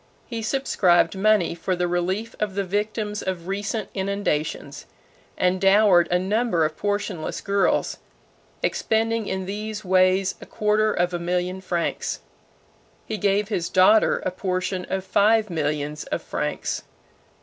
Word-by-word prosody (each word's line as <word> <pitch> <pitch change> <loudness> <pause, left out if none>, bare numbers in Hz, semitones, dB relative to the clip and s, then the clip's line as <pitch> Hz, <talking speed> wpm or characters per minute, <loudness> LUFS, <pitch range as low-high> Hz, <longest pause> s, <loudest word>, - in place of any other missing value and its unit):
He 230 -2 -5
subscribed 215 -8 +2
money 205 -3 +3
for 170 +2 -2
the 180 0 0
relief 185 +6 -2
of 210 -3 -2
the 200 - 0
victims 210 +2 -2
of 180 -2 -4
recent 200 +2 -2
inundations, 195 -6 -2 0.5
and 185 +1 +1
dowered 195 -3 +5
a 180 - +3
number 190 -2 +1
of 155 0 -3
portionless 205 -5 -2
girls; 200 0 +1 0.7
expending 225 -1 0
in 190 0 -3
these 210 +2 -5
ways 185 +1 +3
a - - -10
quarter 215 0 +1
of 180 -2 0
a 175 - -1
million 180 +2 -2
francs. 175 -2 -2 0.8
He 215 - -4
gave 200 +2 +1
his 175 -6 -1
daughter 190 +4 +4
a 185 - 0
portion 185 0 -2
of 190 0 -3
five 215 +1 +3
millions 150 -1 -2
of - - -3
francs. - - -3
190 Hz, 140 wpm, -24 LUFS, 180-210 Hz, 0.8 s, dowered